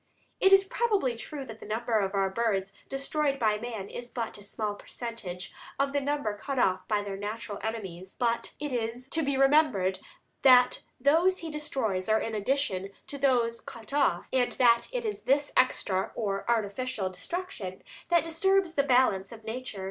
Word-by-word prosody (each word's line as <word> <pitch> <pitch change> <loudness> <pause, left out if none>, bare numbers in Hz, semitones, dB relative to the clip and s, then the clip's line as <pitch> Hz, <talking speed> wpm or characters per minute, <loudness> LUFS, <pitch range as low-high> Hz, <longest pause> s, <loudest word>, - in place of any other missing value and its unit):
It 385 - +5
is 390 0 +8
probably 390 - 0
true 275 +4 -6
that 225 -3 -10
the - - -10
number 225 +1 0
of 195 0 -1
our 195 -1 +1
birds 195 -3 0 0.2
destroyed 275 +1 0
by 215 -4 +2
man 220 -4 -5
is 240 +3 -7
but 230 -2 -4
a - - -12
small 205 +1 -3
percentage 205 -5 -7 0.2
of 275 0 0
the 285 - +1
number 280 -7 -1
cut 275 +6 -5
off 185 -6 +2
by 210 -1 +1
their 200 -1 -5
natural 210 0 -5
enemies; 190 -5 -5
but 235 -1 0
it 295 -2 -3
is 240 +2 -3
to 325 - +2
be 280 -2 0
remembered 270 -10 +3 0.4
that 250 -2 +6 0.2
those 330 +8 +4
he 320 - -4
destroys 235 -11 -2
are 220 0 +4
in 225 - -3
addition 210 -4 0 0.2
to 280 - -5
those 240 -4 +2
thus - - -13
cut 230 +3 -10
off, 270 -12 +2
and 250 -2 +2
that 235 -2 +4
it - - -3
is 420 -1 -2
this 285 +2 +2
extra 195 -7 +2
or 200 -1 -2
artificial 220 -2 -1
destruction 195 - -5 0.3
that 340 -1 +4
disturbs 355 +2 +2
the 285 - +3
balance 250 -8 +3
of 225 -1 -11
nature. 225 -1 -5
235 Hz, 180 wpm, -29 LUFS, 205-280 Hz, 0.4 s, is